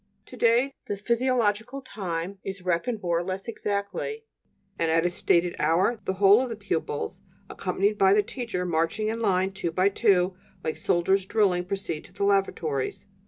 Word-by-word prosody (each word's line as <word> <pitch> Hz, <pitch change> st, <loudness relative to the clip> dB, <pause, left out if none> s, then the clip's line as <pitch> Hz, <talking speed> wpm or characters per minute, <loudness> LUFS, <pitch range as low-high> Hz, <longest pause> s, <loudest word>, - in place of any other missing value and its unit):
To -, -, -12 dB
day 240 Hz, +4 st, +3 dB
the 205 Hz, -, -2 dB
physiological 235 Hz, +1 st, 0 dB
time 190 Hz, -4 st, -4 dB
is 195 Hz, -1 st, -6 dB
reckoned 185 Hz, +6 st, -1 dB
more 170 Hz, -1 st, +1 dB
or -, -, -2 dB
less 190 Hz, +3 st, -4 dB
exactly, 210 Hz, -, -3 dB, 0.6 s
and 165 Hz, -, +1 dB
at 165 Hz, +1 st, +3 dB
a 175 Hz, -, +2 dB
stated 175 Hz, 0 st, +1 dB
hour 180 Hz, +9 st, +2 dB
the 190 Hz, -, 0 dB
whole 200 Hz, +4 st, +6 dB
of 260 Hz, -, -2 dB
the 230 Hz, -, -4 dB
pupils, 165 Hz, -, -3 dB, 0.3 s
accompanied 205 Hz, +2 st, -1 dB
by 195 Hz, 0 st, +6 dB
the 210 Hz, -, +4 dB
teacher, 210 Hz, -6 st, -4 dB
marching 170 Hz, +6 st, 0 dB
in 225 Hz, +1 st, -2 dB
line 190 Hz, -3 st, +1 dB
two 190 Hz, -3 st, -3 dB
by 185 Hz, +4 st, +3 dB
two, 195 Hz, -3 st, +2 dB, 0.3 s
like 155 Hz, -, -2 dB
soldiers 185 Hz, +2 st, +2 dB
drilling, 190 Hz, -4 st, +2 dB
proceed 180 Hz, -5 st, -3 dB
to -, -, -17 dB
the 200 Hz, +1 st, -3 dB
lavatories. 185 Hz, -8 st, 0 dB
195 Hz, 170 wpm, -26 LUFS, 175-215 Hz, 0.6 s, whole